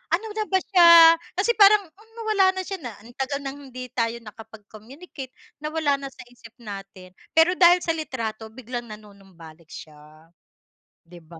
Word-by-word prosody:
Ano 435 +5 -8
na 425 0 -4
ba 380 - -2
siya? 335 -3 +7 0.2
Kasi 400 +6 +1
parang 405 -3 +5
hmm, 430 +6 -24
nawala 435 -4 +1
na 375 - -4
siya 385 0 -7
na 245 -8 -9
ang 240 - -15
tagal 280 +1 -3
ng 275 +1 -8
hindi 255 -1 -10
tayo 230 -2 -2
nakapag-communicate, 225 - -13 0.2
nawala 305 -2 -1
na 275 - -7
sa 270 - -13
isip 235 -2 -17
natin. 195 -5 -11 0.2
Pero 325 +2 +5
dahil 355 0 +5
sa 330 - 0
litrato 230 -9 -6
biglang 240 +1 -8
nanunumbalik 195 -7 -15
siya, 155 +1 -15 0.8
di 175 -1 -15
ba? 165 +1 -15
255 Hz, 165 wpm, -23 LUFS, 210-335 Hz, 0.8 s, siya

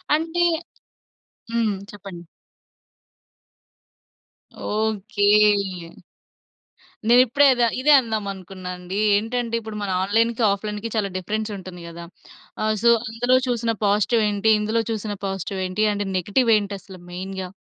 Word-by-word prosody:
అంటే 330 +2 0 1.1
హ్మ్. 225 -3 +1 0.2
చెప్పండి. 190 -4 -10 2.5
ఓకే. 205 -4 +1 1.1
నేనిప్పుడే 255 +3 +5
ఇద్ 245 - -2 0.2
ఇదే 300 +2 +4
అందామనుకున్నానండి. 190 -4 -5 0.2
ఏంటంటే 230 +2 -1
ఇప్పుడు 220 -1 -8
మన 200 - -3
ఆన్‌లైన్‌కి, 225 +4 +1
ఆఫ్‌లైన్‌కి 210 +2 -4
చాలా 205 -2 0
డిఫరెన్స్ 215 +4 -3
ఉంటుంది 185 -2 -10
గదా! 170 0 -9 0.6
ఆహ్, 215 0 +1
సో 235 - +6 0.2
అందులో 245 +3 +2
చూసిన 230 -2 0
పాజిటివ్ 210 +3 +2
ఏంటి? 205 +2 +2
ఇందులో 220 +2 0
చూసిన 210 -1 -3
పాజిటివ్ 195 0 -4
ఏంటి 215 +4 0 0.3
నెగెటివ్ 225 +6 +1
ఏంటసలు 200 -2 -6
మెయిన్‌గా? 190 +1 -5
210 Hz, 100 wpm, -22 LUFS, 195-230 Hz, 2.5 s, సో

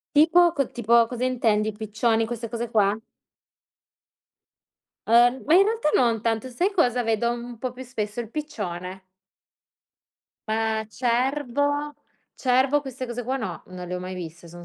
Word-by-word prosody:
Tipo 335 +3 +6
co 275 - +2
tipo 235 0 +3
cosa 250 0 -3
intendi, 220 -4 +1
i - - -10
piccioni 225 +2 0
queste 230 0 -5
cose 235 0 -4
qua? 210 -2 +3 2.1
Uhm, 240 +3 +4
ma 310 - +1
in 390 +2 +7
realtà 440 -8 0
non 230 -3 +2
tanto, 230 +2 -1
sai 350 +11 0
cosa 250 - +2
vedo 225 +1 +1
un 240 -1 -6
po' 255 +1 -4
più 260 +1 -9
spesso, 215 -2 -4
il 225 -1 -7
piccione. 190 - -5 1.5
Eh 220 0 0
cervo 285 +4 0 0.4
cervo 260 +3 +2
queste 260 -1 -6
cose 240 +1 -5
qua 260 +3 -2
no, 185 -8 -5
non 180 -1 -8
le 180 - -3
ho - - -2
mai 185 +1 -6
viste, 170 -1 -8
sono 175 +1 -11
235 Hz, 155 wpm, -24 LUFS, 215-260 Hz, 2.1 s, in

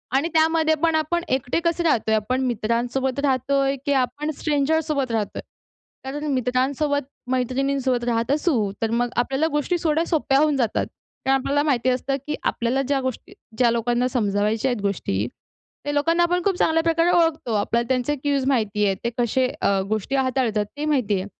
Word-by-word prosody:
आणि 280 +5 +2
त्यामध्ये 320 0 +3
पण 325 -1 +3
आपण 325 +2 0
एकटे 260 +2 0
कसे 340 0 +1
राहतोय? 225 -9 +2
आपण 250 +5 -1
मित्रांसोबत 245 +3 -1
राहतोय, 275 0 +1
की 285 - +2
आपण 280 +3 -1
स्ट्रेंजरसोबत 295 -2 0
राहतोय. 220 -3 -2 0.6
कारण 275 +3 -5
मित्रांसोबत, 265 +3 0 0.3
मैत्रिणींसोबत 260 0 0
राहत 235 +1 0
असू 280 - +1
तर 225 -1 0
मग 240 +1 +1
आपल्याला 270 +5 +1
गोष्टी 295 +4 0
थोड्या 320 +1 +2
सोप्या 295 -5 +1
होऊन 300 -1 +3
जातात 235 -5 0 0.4
कारण 270 0 +4
आपल्याला 290 +2 0
माहिती 255 -4 +1
असतं 255 +2 0
की, 300 - -1
आपल्याला 240 +3 0
ज्या 275 0 0
गोष्टी 260 -2 -5 0.2
ज्या 240 -1 +4
लोकांना 240 +2 +1
समजावायच्या 215 0 0
आहेत 240 -4 -3
गोष्टी 145 - -1 0.6
त्या 290 - -2
लोकांना 330 +4 +2
आपण 355 +1 +1
खूप 395 -2 +2
चांगल्या 325 0 +2
प्रकारे 330 +1 +2
ओळखतो. 325 -8 +1
आपल्याला 230 +3 0
त्यांचे 260 +3 0
क्यूज 280 -1 -1
माहिती 215 -6 +1
आहे. 195 -1 +1
ते 235 - 0
कसे 250 +2 +1
अ, 195 -1 +2
गोष्टी 220 +5 -1
हाताळतात 255 -5 +1
ते 295 - -2
माहिती 255 -9 +1
आहे. - - -6
265 Hz, 170 wpm, -23 LUFS, 235-295 Hz, 0.6 s, कारण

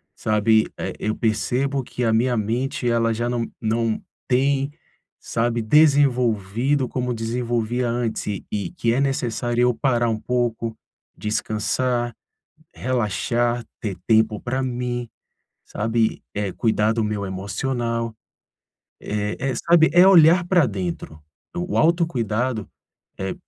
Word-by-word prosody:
sabe, 110 0 +2
eh, - - -4
eu 110 +1 -1
percebo 130 +5 0
que 125 - -5
a 115 -1 +2
minha 120 +2 +2
mente 120 +4 -1
ela 115 -1 +2
já 120 +2 -2
não 120 -1 -2
não 115 0 0 0.3
tem, 135 +2 +1 0.5
sabe, 115 +1 -1
desenvolvido 125 -2 +3
como 125 0 -2
desenvolvia 120 +1 -1
antes 120 -1 -2
e 105 -2 -4
e 105 -2 -2
que 120 -10 0
é 125 - +1
necessário 120 -3 -1
eu 125 0 +3
parar 120 -2 +1
um 110 -1 -1
pouco, 115 -1 -2 0.4
descansar, 120 +3 -1 0.6
relaxar, 120 0 0 0.2
ter 100 -4 -3
tempo 110 -1 +3
pra 130 +2 -2
mim, 120 -1 -3 0.6
sabe, 115 +1 -1
é 100 -1 -2
cuidar 110 +1 +1
do 115 -1 0
meu 105 -1 -2
emocional. 115 +5 -2 0.9
É 105 0 -3
é, - - -2
sabe, 170 0 +4
é 175 +2 +7
olhar 175 -1 +6
pra 175 -5 +4
dentro, 90 -6 -5 0.4
o 180 +1 -3
o - - +2
autocuidado 130 - +1 0.5
é 95 0 -3
120 Hz, 130 wpm, -22 LUFS, 110-130 Hz, 0.9 s, é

